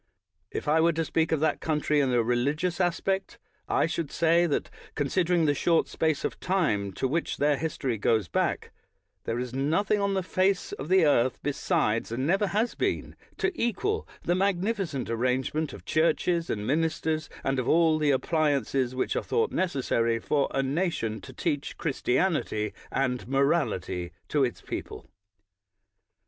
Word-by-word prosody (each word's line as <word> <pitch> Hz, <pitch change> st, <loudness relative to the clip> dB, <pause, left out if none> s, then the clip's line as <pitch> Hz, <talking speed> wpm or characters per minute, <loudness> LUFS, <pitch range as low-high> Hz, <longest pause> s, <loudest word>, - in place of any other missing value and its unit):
If -, -, -5 dB
I 155 Hz, +2 st, +4 dB
were 170 Hz, +1 st, +4 dB
to 165 Hz, +1 st, -1 dB
speak 160 Hz, 0 st, 0 dB
of 160 Hz, -2 st, +1 dB
that 155 Hz, -1 st, +1 dB
country 150 Hz, -1 st, +1 dB
in 135 Hz, -3 st, +2 dB
a 120 Hz, -2 st, +3 dB
re 120 Hz, +2 st, +1 dB
ligious 155 Hz, +8 st, 0 dB
aspect, 190 Hz, +2 st, -1 dB, 0.3 s
I -, -, +3 dB
should 165 Hz, -2 st, -2 dB
say 170 Hz, +1 st, +3 dB
that, 145 Hz, -, -1 dB, 0.2 s
considering 170 Hz, +3 st, +1 dB
the 145 Hz, -, +3 dB
short 165 Hz, +3 st, +2 dB
space 155 Hz, -2 st, 0 dB
of -, -, -3 dB
time 150 Hz, -, 0 dB
to 130 Hz, -, -1 dB
which 165 Hz, +6 st, -1 dB
their 145 Hz, 0 st, +3 dB
history 135 Hz, -6 st, -2 dB
goes 110 Hz, -2 st, +2 dB
back, -, -, -1 dB, 0.5 s
there 115 Hz, -, -1 dB
is 125 Hz, 0 st, -4 dB
nothing 165 Hz, +10 st, +1 dB
on 200 Hz, -1 st, 0 dB
the 190 Hz, -, 0 dB
face 185 Hz, +1 st, +1 dB
of 145 Hz, -, -6 dB
the 185 Hz, -2 st, +5 dB
earth 130 Hz, -4 st, +3 dB
besides, 145 Hz, -, 0 dB
and 130 Hz, +3 st, -1 dB
never 195 Hz, +6 st, +2 dB
has 215 Hz, +5 st, 0 dB
been, -, -, -2 dB, 0.2 s
to 375 Hz, -, +1 dB
equal 395 Hz, -, -1 dB, 0.2 s
the 175 Hz, -, +1 dB
mag 190 Hz, 0 st, +1 dB
nificent 190 Hz, -, -2 dB
arrangement 130 Hz, +6 st, -1 dB
of -, -, -11 dB
churches 165 Hz, +1 st, +1 dB
and 105 Hz, -1 st, -2 dB
ministers, 155 Hz, +2 st, 0 dB
and 135 Hz, -1 st, 0 dB
of 125 Hz, -, -1 dB
all 160 Hz, -1 st, +4 dB
the 150 Hz, -1 st, +2 dB
appliances 140 Hz, -3 st, +1 dB
which 130 Hz, -, -1 dB
are -, -, +1 dB
thought 450 Hz, -1 st, 0 dB
nec 185 Hz, -1 st, +1 dB
essary 115 Hz, -5 st, 0 dB
for 140 Hz, +4 st, +1 dB
a 135 Hz, -, 0 dB
nation 135 Hz, -, -1 dB
to -, -, -10 dB
teach 145 Hz, -4 st, -3 dB
Christianity 130 Hz, -, 0 dB, 0.2 s
and 125 Hz, -3 st, -1 dB
morality 120 Hz, -, 0 dB, 0.2 s
to 145 Hz, -2 st, +2 dB
its 120 Hz, -3 st, -2 dB
people. -, -, -6 dB
150 Hz, 170 wpm, -27 LUFS, 130-175 Hz, 0.5 s, the